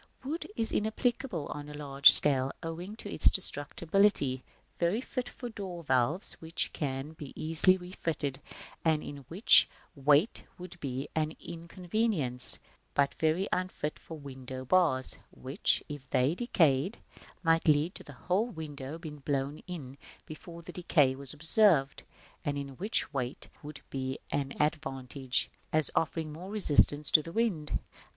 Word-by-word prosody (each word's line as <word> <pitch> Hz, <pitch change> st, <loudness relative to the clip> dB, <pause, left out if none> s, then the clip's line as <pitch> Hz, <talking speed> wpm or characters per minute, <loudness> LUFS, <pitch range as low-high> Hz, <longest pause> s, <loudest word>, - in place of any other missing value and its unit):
Wood 305 Hz, +6 st, -4 dB
is 225 Hz, -, +1 dB
inapplicable 220 Hz, -, -1 dB
on 145 Hz, 0 st, -7 dB
a 150 Hz, -, -9 dB
large 140 Hz, -1 st, +7 dB
scale, 135 Hz, -2 st, +6 dB
owing 170 Hz, +5 st, -6 dB
to 205 Hz, -2 st, -8 dB
its -, -, +3 dB
destructibility; 160 Hz, -3 st, 0 dB, 0.4 s
very 175 Hz, +6 st, +1 dB
fit 250 Hz, -1 st, -5 dB
for 245 Hz, -, -8 dB
door 190 Hz, -6 st, -7 dB
valves, 135 Hz, -, 0 dB
which 165 Hz, +1 st, +1 dB
can 135 Hz, 0 st, -4 dB
be 150 Hz, -3 st, -10 dB
easily 165 Hz, +4 st, +2 dB
refitted, 165 Hz, -6 st, -4 dB, 0.4 s
and 160 Hz, -2 st, +1 dB
in 145 Hz, -, -7 dB
which 185 Hz, -, +7 dB, 0.3 s
weight 145 Hz, -, +2 dB, 0.2 s
would 180 Hz, -1 st, -11 dB
be 135 Hz, -1 st, -4 dB
an 155 Hz, 0 st, -1 dB
inconvenience, 170 Hz, -, -2 dB, 0.4 s
but 140 Hz, -1 st, +2 dB
very 160 Hz, +5 st, +1 dB
unfit 180 Hz, -4 st, -3 dB
for 160 Hz, -, -10 dB
window 130 Hz, -2 st, -8 dB
bars, 145 Hz, -5 st, +1 dB
which, 130 Hz, +2 st, -2 dB
if 145 Hz, -3 st, -9 dB
they 130 Hz, +5 st, +2 dB
decayed, 175 Hz, -, +1 dB, 0.5 s
might 165 Hz, 0 st, +2 dB
let 155 Hz, +4 st, +3 dB
the 145 Hz, -, -11 dB
whole 185 Hz, -, -1 dB
window 155 Hz, -, -7 dB
be 165 Hz, -2 st, -8 dB
blown 140 Hz, 0 st, -3 dB
in 140 Hz, -7 st, -8 dB, 0.3 s
before 170 Hz, +2 st, -11 dB
their 180 Hz, -, -10 dB
decay 150 Hz, -6 st, +2 dB
was 140 Hz, -1 st, +6 dB
observed, 160 Hz, -, +5 dB, 0.4 s
and 145 Hz, 0 st, -2 dB
in 140 Hz, -1 st, -5 dB
which 170 Hz, -, -2 dB
weight 130 Hz, -1 st, -4 dB
would 150 Hz, 0 st, -10 dB
be 130 Hz, -1 st, -3 dB
an 140 Hz, -1 st, -2 dB
advantage, 135 Hz, -4 st, -2 dB, 0.2 s
as 155 Hz, -1 st, +3 dB
offering 155 Hz, 0 st, -2 dB
more 175 Hz, +5 st, -9 dB
resistance 150 Hz, -7 st, +3 dB
to 155 Hz, -, +7 dB
the 165 Hz, -, -9 dB
wind. 180 Hz, -8 st, 0 dB
155 Hz, 145 wpm, -30 LUFS, 140-180 Hz, 0.5 s, large